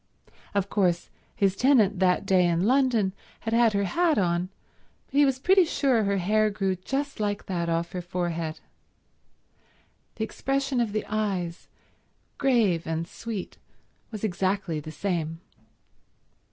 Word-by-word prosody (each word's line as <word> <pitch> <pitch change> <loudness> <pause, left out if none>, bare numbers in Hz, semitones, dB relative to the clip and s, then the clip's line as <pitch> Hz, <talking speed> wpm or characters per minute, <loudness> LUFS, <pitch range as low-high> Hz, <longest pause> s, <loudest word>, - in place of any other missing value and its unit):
Of 200 -1 +1
course 180 -4 0 0.2
his 195 -1 +2
tenant 220 -6 +3
that 185 +1 +2
day 185 -2 +4
in 170 +2 +1
London 240 -6 +2 0.3
had 225 - -3
had 230 -1 +4
her 200 0 +1
hat 330 - +2
on, 175 -1 +1 0.6
but - - -34
he 290 +1 +5
was 270 -2 +1
pretty 375 +7 +5
sure 270 -9 +1
her 200 0 +1
hair 215 +4 +2
grew 195 -2 -1
just 270 +9 -3
like 205 -1 -2
that 170 -3 -2
off 165 +1 -1
her 180 - -4
forehead. 170 -3 -3 1.5
The 220 - -3
expression 270 +3 -1
of 225 -3 -1
the 215 +1 -2
eyes, 195 -5 -2 0.7
grave 225 - +2
and 165 +1 -2
sweet, 215 -1 -6 0.5
was 215 -2 -7
exactly 190 -4 -1
the 155 +1 -8
same. 165 -2 -2
200 Hz, 140 wpm, -26 LUFS, 175-230 Hz, 1.5 s, he